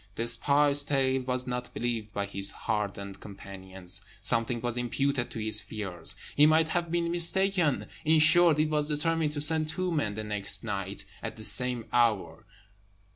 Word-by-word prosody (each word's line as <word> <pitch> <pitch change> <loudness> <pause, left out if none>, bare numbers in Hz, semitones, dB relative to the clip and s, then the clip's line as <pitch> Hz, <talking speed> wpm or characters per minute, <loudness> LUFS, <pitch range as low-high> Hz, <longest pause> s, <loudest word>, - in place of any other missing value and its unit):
The 115 - -3
spy's 140 +5 +3
tale 135 -2 0
was 125 0 -3
not 125 0 -5
believed 115 -2 -4
by 100 -1 -3
his 100 0 -1
hardened 100 -3 -4
companions; 95 -2 -7 0.2
something 115 0 +1
was 120 0 -4
imputed 125 +1 -1
to - - -9
his 110 -1 +1
fears; 100 -5 -4 0.2
he 150 +1 +5
might 160 +1 +2
have 170 0 -2
been 170 0 -1
mistaken; 175 -2 +3 0.2
in 160 +1 +3
short, 160 +1 +5
it 155 0 0
was 150 -1 0
determined 155 0 -1
to 145 - -2
send 155 0 +2
two 185 +2 -2
men 110 -11 -2
the 110 - -5
next 105 0 -3
night 100 -2 -5 0.2
at 110 - -7
the 110 - -9
same 125 +1 +3
hour. 115 -5 0
125 Hz, 170 wpm, -27 LUFS, 105-155 Hz, 0.2 s, he